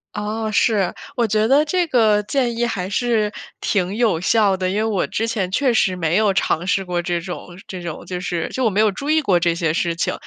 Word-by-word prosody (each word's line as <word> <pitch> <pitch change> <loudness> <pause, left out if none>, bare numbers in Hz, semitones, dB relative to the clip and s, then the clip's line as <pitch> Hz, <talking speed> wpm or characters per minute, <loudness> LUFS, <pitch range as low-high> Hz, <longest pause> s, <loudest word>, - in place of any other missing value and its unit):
哦， 215 +1 -3
是， 210 -3 +2 0.2
我 240 - +2
觉 215 0 +1
得 275 +4 +5
这 350 +3 0
个 215 -6 +3
建 240 0 -1
议 240 - +1
还 190 -5 -3
是 220 -1 0 0.3
挺 190 -1 0
有 220 -8 +2
效 200 +1 +2
的。 185 0 -1
因 190 - -2
为 215 - +1
我 215 -4 0
之 225 - -2
前 195 -5 -2
确 255 +5 +2
实 190 -4 +2
没 165 -1 0
有 210 -2 +3
尝 180 -2 0
试 195 +1 +1
过 180 -1 -2
这 175 0 -2
种 180 0 -7 0.2
这 185 -2 -7
种 170 -2 -7
就 180 -1 -5
是 175 -2 -3
就 260 - -2
我 - - +4
没 200 0 -1
有 215 - +3
注 280 +9 -6
意 315 0 +3
过 185 -10 +2
这 170 -1 +1
些 165 -2 0
事 170 0 -1
情。 165 - -1
205 Hz, 255 characters per minute, -20 LUFS, 180-230 Hz, 0.3 s, 得